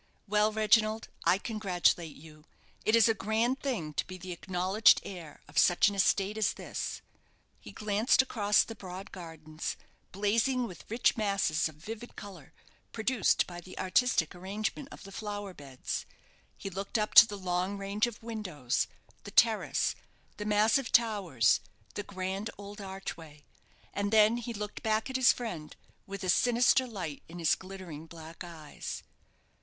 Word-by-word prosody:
Well, 210 +1 +3
Reginald, 215 0 +2 0.2
I 180 - +5
congratulate 185 -6 0
you. 155 0 -15 0.4
It 215 - +4
is 230 -1 +6
a 225 - +4
grand 225 +5 0
thing 210 - -3
to - - -2
be 185 - -7
the 185 0 -8
acknowledged 185 +4 +3
heir 170 -6 -9
of 145 - 0
such 175 +3 +5
an - - -5
estate 200 +1 +2
as 215 - +2
this." - - -5 0.6
He - - -11
glanced 215 +5 +2
across 210 -5 +3
the 225 - -8
broad 190 -2 -9
gardens, 160 -3 -6 0.3
blazing 225 +6 +1
with 185 -6 -10
rich 230 +2 +2
masses 200 -7 +1
of 155 - -14
vivid 225 +9 -8
colour, 185 -8 -10 0.4
produced 225 -2 +2
by 175 -1 -8
the 185 +2 -12
artistic 185 -3 +2
arrangement 210 +9 -4
of - - -11
the 195 - -11
flower 205 -1 -5
beds. 135 -5 -5 0.5
He 195 - -6
looked 195 +5 -3
up 215 -1 -1
to 230 - +11
the 205 - -6
long 185 +1 -1
range 200 +3 0
of 230 -2 -9
windows, 185 - -2 0.4
the - - -8
terrace, - - +3 0.4
the 210 - -5
massive 215 +4 +3
towers, 195 - +3 0.3
the - - -3
grand 195 +2 -4
old 205 +1 -9
archway, 170 -6 -8 0.5
and 200 0 -1
then 220 +1 +5
he 240 0 -5
looked 210 -2 -6
back 220 +2 0
at - - -7
his 260 -2 +6
friend, 180 -11 -6 0.3
with 200 0 -6
a 185 - -2
sinister 245 +6 +4
light 180 - -5
in 170 - -9
his 165 -3 +3
glittering 185 -5 -8
black 165 +1 -10
eyes. 160 -4 -7
200 Hz, 160 wpm, -30 LUFS, 175-220 Hz, 0.6 s, to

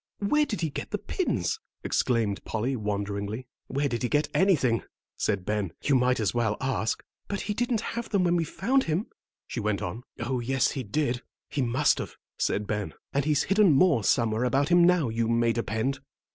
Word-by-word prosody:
"Where 300 +9 +2
did 210 - -3
he 160 -3 -1
get - - -5
the - - -1
pins?" - - -1 0.2
exclaimed 115 -5 0
Polly, 120 +5 -1
wonderingly. 105 +1 -3 0.2
"Where 140 +2 0
did 120 -4 -2
he 125 - 0
get 150 0 +1
anything," 140 - +3 0.3
said 100 -4 -1
Ben, 105 -5 -1
"you 145 - +2
might 125 -1 +3
as 110 - +1
well 110 -3 +1
ask." 130 -4 -1 0.2
"But 200 - -3
he 210 - -2
didn't 235 0 0
have 235 0 -4
them 200 -4 +2
when 175 -1 +3
we 170 - +2
found 235 - +1
him," 165 +7 0 0.4
she - - -5
went 105 -1 -1
on. 100 +6 -4 0.2
"Oh, 125 +2 -1
yes, 130 +2 +1
he 135 - -3
did; 125 +2 -1 0.3
he 145 - 0
must 130 +4 +2
have," - - -5 0.2
said 105 - 0
Ben; 105 -6 -3 0.2
"and 140 0 +1
he's 150 -3 +2
hidden 195 -3 +4
more 140 - +4
somewhere 115 +1 +2
about 135 +3 +2
him 175 0 +6
now, 175 -7 +4
you 115 0 0
may 115 0 +2
depend. 115 +4 -1
130 Hz, 195 wpm, -27 LUFS, 110-165 Hz, 0.4 s, him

